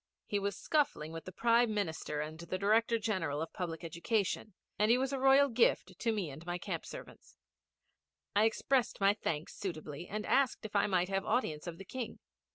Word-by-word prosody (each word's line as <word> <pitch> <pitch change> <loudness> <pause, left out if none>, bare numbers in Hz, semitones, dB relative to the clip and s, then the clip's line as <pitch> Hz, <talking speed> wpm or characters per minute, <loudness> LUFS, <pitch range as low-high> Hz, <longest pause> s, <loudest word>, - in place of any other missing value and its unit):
He 205 - 0
was 200 -1 -2
scuffling 280 - 0
with 165 0 -7
the 185 - -7
Prime 230 +2 +3
Minister 160 -6 -2
and 155 +1 -6
the 170 +2 -3
Director 225 +4 +3
General 185 -10 -1
of 160 - -4
Public 170 -2 -4
Education, 190 +4 -1 0.2
and 210 +1 +4
he 240 - +6
was 265 +1 -1
a 270 - -1
royal 270 +1 +6
gift 225 -6 +2
to 230 - +1
me 200 -9 -2
and 150 +4 -10
my 175 0 -3
camp - - -4
servants. - - -11 1.0
I 210 +2 +5
expressed 245 +3 +1
my 200 0 +5
thanks 160 -7 -3
suitably, 165 -4 -5
and 215 +1 -4
asked 265 -3 +2
if 210 - -7
I 200 - +4
might 180 -2 +1
have 195 0 0
audience 195 -9 -1
of 170 -1 -5
the 195 - -9
King. 240 +2 -5
200 Hz, 195 wpm, -33 LUFS, 170-230 Hz, 1.0 s, he